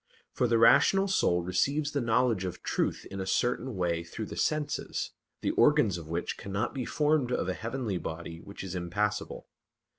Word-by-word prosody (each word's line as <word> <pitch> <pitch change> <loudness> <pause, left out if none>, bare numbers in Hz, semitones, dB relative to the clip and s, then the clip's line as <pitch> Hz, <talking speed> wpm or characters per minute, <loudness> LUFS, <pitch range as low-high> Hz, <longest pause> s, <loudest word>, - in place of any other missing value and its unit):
For 125 - +1
the 115 0 +3
rational 195 +12 +5
soul 90 - +2
receives 140 - 0
the 140 - -1
knowledge 115 -3 +2
of 90 -2 -5
truth - - -1
in 95 0 -4
a 95 - -4
certain 125 +3 0
way 85 -2 0
through 105 +6 -6
the - - -8
senses, 150 -1 -1 0.3
the - - +1
organs 125 - +4
of 80 - -10
which 85 +2 -3
cannot 100 +4 -2
be 130 -3 -3
formed 150 -3 +1
of 125 - 0
a 95 - 0
heavenly 115 -3 -3
body 85 0 -6
which 100 +1 -9
is 95 -2 -5
impassible. 105 +4 -2
110 Hz, 180 wpm, -29 LUFS, 90-130 Hz, 0.3 s, rational